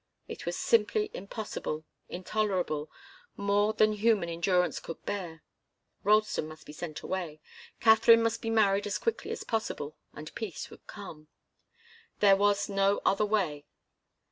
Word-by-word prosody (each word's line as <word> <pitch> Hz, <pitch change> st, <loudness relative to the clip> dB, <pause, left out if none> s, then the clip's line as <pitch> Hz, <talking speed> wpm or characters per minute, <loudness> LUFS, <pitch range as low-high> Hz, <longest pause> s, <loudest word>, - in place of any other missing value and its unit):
It -, -, -8 dB
was -, -, -1 dB
simply 435 Hz, -2 st, +2 dB
impossible, 200 Hz, -6 st, -5 dB, 0.2 s
intolerable, 185 Hz, -5 st, -1 dB, 0.5 s
more 205 Hz, +1 st, +2 dB
than 215 Hz, 0 st, +3 dB
human 210 Hz, -4 st, +2 dB
endurance 180 Hz, +1 st, +1 dB
could 165 Hz, -, -9 dB
bear. 175 Hz, -6 st, -4 dB, 0.6 s
Ralston 215 Hz, -5 st, +2 dB
must 155 Hz, 0 st, -12 dB
be 150 Hz, -, -10 dB
sent 155 Hz, -1 st, -6 dB
away, 170 Hz, -5 st, -4 dB, 0.4 s
Katharine 225 Hz, +1 st, +6 dB
must 230 Hz, 0 st, 0 dB
be 225 Hz, -, -3 dB
married 205 Hz, -2 st, +3 dB
as 205 Hz, -, -1 dB
quickly 460 Hz, -, -2 dB
as -, -, -4 dB
possible, 185 Hz, -, -3 dB, 0.2 s
and 155 Hz, +1 st, -9 dB
peace 215 Hz, -7 st, -6 dB
would -, -, -15 dB
come. 165 Hz, -7 st, -10 dB, 0.9 s
There 200 Hz, -2 st, +7 dB
was 205 Hz, +1 st, +2 dB
no 195 Hz, 0 st, +2 dB
other 210 Hz, +2 st, +3 dB
way. 170 Hz, -9 st, -1 dB
200 Hz, 140 wpm, -30 LUFS, 170-215 Hz, 0.9 s, There